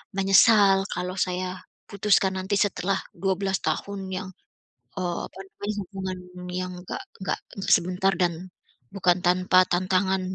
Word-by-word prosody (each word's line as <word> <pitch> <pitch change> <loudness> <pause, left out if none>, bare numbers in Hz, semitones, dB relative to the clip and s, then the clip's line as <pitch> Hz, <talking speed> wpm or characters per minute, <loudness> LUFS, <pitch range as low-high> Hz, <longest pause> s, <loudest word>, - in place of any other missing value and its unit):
menyesal 195 0 +5
kalau 180 +1 -3
saya 185 0 -2 0.3
putuskan 200 -1 +2
nanti 195 +2 -1
setelah 195 -1 +1 0.2
12 195 +1 0
tahun 190 +5 -3
yang, 190 0 -5 0.7
eee, 175 -2 -2
apa - - -15
namanya 205 +2 -5
hubungan 190 -1 -5 0.3
yang 185 0 -3
enggak - - -5 0.2
enggak - - -1 0.4
sebentar 185 +2 +1
dan, 175 +1 -1 0.4
bukan 180 -2 +3
tanpa 185 +1 +5
tantangan 185 +1 +1
190 Hz, 120 wpm, -25 LUFS, 180-195 Hz, 0.7 s, menyesal